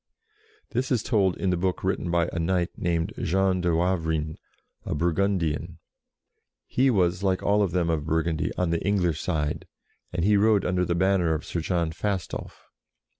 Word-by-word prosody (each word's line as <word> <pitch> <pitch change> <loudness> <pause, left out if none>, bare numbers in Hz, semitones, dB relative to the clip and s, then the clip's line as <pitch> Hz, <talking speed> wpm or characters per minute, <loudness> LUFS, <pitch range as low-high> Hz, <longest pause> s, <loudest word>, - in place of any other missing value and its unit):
This 130 +2 -1
is 120 -3 +2
told 100 -6 +2
in 95 - 0
the - - +2
book 90 +1 -1
written 95 -1 -1
by 85 0 +2
a 85 - -2
knight 90 +1 0
named 85 +3 -1
Jean 95 +1 +1
de 90 - +1
Wav 85 0 +1
rin, 80 -1 -1 0.5
a - - -3
Burgundian. 85 -1 0 0.9
He 135 +2 +2
was, 90 -5 +2
like 95 -2 0
all 105 +1 +3
of 100 - +2
them 85 -1 0
of 80 -3 -1
Burgundy, 80 0 0
on 90 -2 0
the 85 - -1
English 90 -6 +1
side, 75 -4 -2 0.4
and 85 0 -1
he 105 0 +4
rode 105 -1 +3
under 90 0 +1
the 85 - 0
banner 90 -2 +2
of 80 - -5
Sir 85 - -3
John 85 -1 0
Fastolf. 95 +2 -4
90 Hz, 175 wpm, -26 LUFS, 85-95 Hz, 0.9 s, he